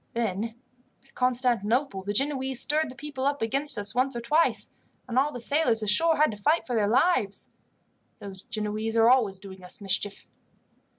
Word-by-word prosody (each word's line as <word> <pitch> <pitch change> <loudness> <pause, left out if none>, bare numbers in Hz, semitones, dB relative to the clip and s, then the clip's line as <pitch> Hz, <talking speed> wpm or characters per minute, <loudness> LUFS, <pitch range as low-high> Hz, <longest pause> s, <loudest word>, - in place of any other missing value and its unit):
Then 225 0 -2 0.5
at 270 - -26
Constantinople 245 -2 0
the 200 +2 -4
Genoese 265 +2 -1
stirred 305 +1 +1
the 255 - -10
people 270 -1 -4
up 285 -3 -1
against 275 +4 -1
us 205 0 -2
once 255 +2 0
or - - -2
twice, 300 +8 +1 0.4
and 240 - -5
all 275 +3 +2
the 245 - -7
sailors 240 -3 +2
ashore 320 +11 +4
had 305 -2 +3
to 210 - -8
fight 300 +11 +1
for 245 - -3
their 210 -2 +2
lives. 230 - +1 0.7
Those 195 -2 -10
Genoese 215 -1 -4
are 225 +1 +6
always 220 -7 +2
doing 190 -1 -12
us 180 - -7
mischief." 200 0 -2
235 Hz, 175 wpm, -26 LUFS, 210-275 Hz, 0.7 s, are